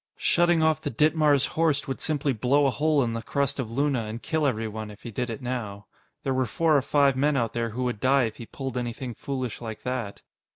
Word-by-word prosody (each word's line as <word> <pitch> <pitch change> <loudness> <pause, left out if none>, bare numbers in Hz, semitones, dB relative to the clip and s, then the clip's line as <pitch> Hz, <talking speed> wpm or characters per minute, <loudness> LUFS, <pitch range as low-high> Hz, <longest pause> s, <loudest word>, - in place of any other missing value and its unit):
Shutting 175 -1 +3
off 160 0 +2
the 145 - -2
Ditmars 150 +1 +3
Horst 155 -3 +1
would 135 - -4
simply 150 -3 0
blow 130 +6 +2
a 135 - +3
hole 150 0 +2
in 115 -1 -1
the 115 - -3
crust 140 +3 -1
of 125 -4 -2
Luna 135 -1 0
and 110 +2 -5
kill 155 +2 0
everyone 110 -3 -3
if 105 0 -13
he 120 - -6
did 125 +3 -2
it 115 +3 -6
now. 105 -5 -4 0.4
There 135 - 0
were 130 -1 +1
four 160 +7 +2
or 140 - +4
five 140 0 +3
men 145 +2 +2
out 115 -3 0
there 115 0 -1
who 120 +4 -3
would 125 -4 -2
die 135 +2 +4
if 110 -2 -3
he 115 - -9
pulled 135 -2 -5
anything 120 +1 -4
foolish 130 -2 -4
like 110 -2 -7
that. 125 -5 -4
130 Hz, 235 wpm, -26 LUFS, 115-145 Hz, 0.4 s, or